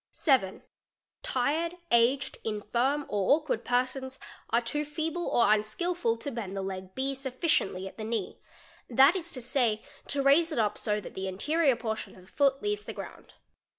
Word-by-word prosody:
7. 255 - +2 0.6
Tired, 310 +7 0 0.2
aged, 240 +4 +3
infirm, 240 +7 0
or 205 +4 +3
awkward 300 -7 -2
persons 255 +2 -1 0.3
are 235 - +3
too 270 +5 -2
feeble 320 +3 -3
or 235 - +3
unskil 215 +13 -1
ful 230 -10 0
to 280 +5 -5
bend 200 -5 -5
the 195 - -2
leg 190 -1 -6
B 270 +1 -1
sufficiently 260 - -1
at - - -11
the - - -4
knee, 225 +1 -3 0.5
that 270 +7 +6
is 340 -2 -4
to 255 - -4
say, 235 -3 +1 0.2
to 280 -1 -1
raise 315 +5 +5
it 305 - -3
up 215 -3 +2
so 210 -1 0
that - - -9
the 190 0 -4
anterior 280 - +2
portion 220 -2 -4
of 185 - -15
the 185 - -20
foot 275 -1 +2
leaves 415 0 -1
the - - -6
ground. - - -10
255 Hz, 180 wpm, -29 LUFS, 215-295 Hz, 0.6 s, that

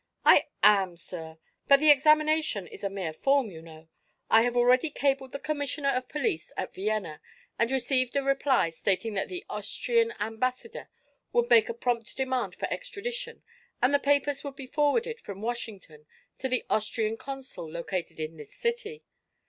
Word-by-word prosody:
"I - - +7 0.2
am, 195 -4 +5
sir. 160 -2 -8 0.3
But 275 0 +7
the 305 0 +7
examination 305 - +3
is - - -12
a 200 - 0
mere 190 -5 -4
form, 270 - +2
you 160 -2 -10
know. 160 -1 -14 0.4
I 225 - +7
have 245 +1 0
already 250 +5 +4
cabled 270 -2 0
the - - -4
commissioner 285 -1 -2
of 255 -1 -1
police 245 - -2
at - - -4
Vienna 195 -6 -2 0.4
and 230 - +2
received 255 -1 +1
a 280 - +2
reply 270 - +2
stating 200 +6 -1
that 195 - -1
the 360 0 -6
Austrian 460 -2 0
ambassador 230 +2 -3 0.4
would 240 0 +2
make 225 -2 +6
a 235 - -3
prompt 235 -2 -2
demand 260 -1 -1
for - - -3
extradition - - -5 0.4
and 255 +3 +3
the 285 - +5
papers 285 0 +1
would 280 -2 -6
be 275 - -8
forwarded 380 - 0
from 195 -1 -8
Washington 205 -10 -6 0.3
to 265 - -2
the 255 -1 0
Austrian 220 0 0
consul 270 - -7
located 170 +1 -4
in 155 +1 -5
this 150 -2 -12
city. 465 -1 -3
250 Hz, 165 wpm, -28 LUFS, 200-285 Hz, 0.4 s, I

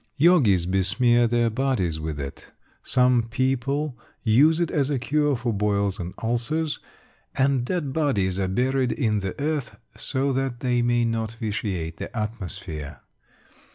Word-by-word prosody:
Yogis 135 - +4
besmear 115 +6 +3
their 120 0 +2
bodies 110 - 0
with 80 -1 -4
it; 70 -1 -7 0.3
some 125 -1 +3
people 135 +3 0 0.3
use 145 +9 +4
it 170 - 0
as 140 -3 +1
a 145 - +1
cure 145 +2 +1
for 120 -1 -2
boils 100 -1 0
and 90 0 -5
ulcers; 145 +7 -1 0.6
and 135 -2 +2
dead 150 -4 -2
bodies 100 - +1
are 95 - 0
buried 125 +5 +1
in 110 -7 0
the 95 -2 -5
earth 145 -3 -2 0.2
so 135 0 -1
that 130 -2 -2
they 125 -2 +1
may 120 0 +2
not 115 -1 -2
vitiate 100 -7 -3
the - - -7
atmosphere. 95 - -5
120 Hz, 145 wpm, -24 LUFS, 100-135 Hz, 0.6 s, Yogis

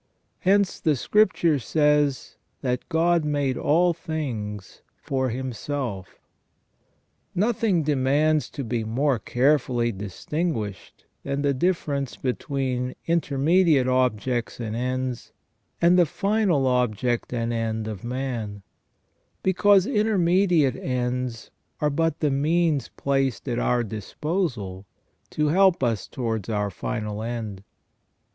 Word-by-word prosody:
Hence 200 0 +2
the 155 -3 +2
Scripture 170 - +2
says 150 +1 +1 0.3
that 125 -2 -2
"God 170 0 +2
made 145 -3 0
all 170 +4 +3
things 115 - -5 0.2
for 130 -1 -1
himself". 125 -4 -4 1.2
Nothing 205 -3 +1
demands 150 +2 +2
to 140 - -5
be 115 -1 -2
more 125 +3 +1
carefully 125 -3 +1
distinguished 105 - -4 0.2
than 140 +1 -2
the 140 -1 +2
difference 140 -3 -1
between 130 -1 -2
intermediate 160 -2 +3
objects 125 -2 0
and 110 -2 -4
ends, 125 0 -3 0.5
and 175 +2 +5
the 175 - +5
final 195 -6 +1
object 125 -1 0
and 120 -1 -1
end 110 -1 -2
of 105 -4 -6
man; 120 -5 -4 0.8
because 195 +1 +4
intermediate 185 - +2
ends 125 -2 -3 0.3
are 150 0 +1
but 165 +1 0
the 150 -2 +2
means 155 +1 +1
placed 135 -2 0
at 120 -1 -1
our 120 0 +1
disposal 110 - -3 0.4
to 150 -1 0
help 185 -2 +4
us 115 -5 0
towards 115 -6 -3
our 105 -2 -1
final 105 +2 -4
end. 110 -4 -5
135 Hz, 110 wpm, -25 LUFS, 120-160 Hz, 1.2 s, and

